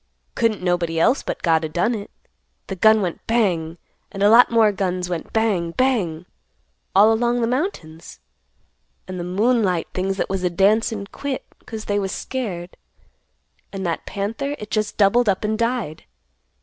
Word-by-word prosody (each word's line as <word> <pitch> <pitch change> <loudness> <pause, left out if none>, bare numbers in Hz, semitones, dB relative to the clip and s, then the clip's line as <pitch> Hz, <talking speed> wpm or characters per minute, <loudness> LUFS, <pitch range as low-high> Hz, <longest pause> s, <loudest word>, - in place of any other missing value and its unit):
Couldn't 225 -5 0
nobody 175 -2 0
else 250 - +3
but - - -5
God 165 -2 +3
o' - - -1
done 175 +9 0
it. 210 -2 -6 0.6
The 195 - -5
gun 220 +2 +4
went 175 -2 -3
bang, 175 -8 0 0.3
and 195 0 -3
a 205 - +6
lot 240 +2 +7
more 225 -2 +4
guns 180 -2 -2
went 170 -2 -4
bang, 200 -7 0
bang, 195 -11 0 0.7
all 210 +3 +6
along 240 +2 +1
the - - +2
mountains. 235 - -4 0.9
And 185 -1 -6
the - - -3
moonlight 195 -1 +1
things 190 +1 -1
that - - -1
was 190 -1 -3
a 180 - +2
dancin' 205 +3 +2
quit 280 -2 -4 0.2
'cause 220 -2 -6
they 205 0 0
was 195 -1 -2
scared; 190 -10 -5 0.9
and 195 -1 -5
that 170 -1 -3
panther 225 +9 -3
it 210 0 -9
just 215 -1 -1
doubled 215 +3 +4
up 190 +1 0
and 215 +1 0
died. 230 -8 -2
200 Hz, 165 wpm, -21 LUFS, 180-225 Hz, 0.9 s, lot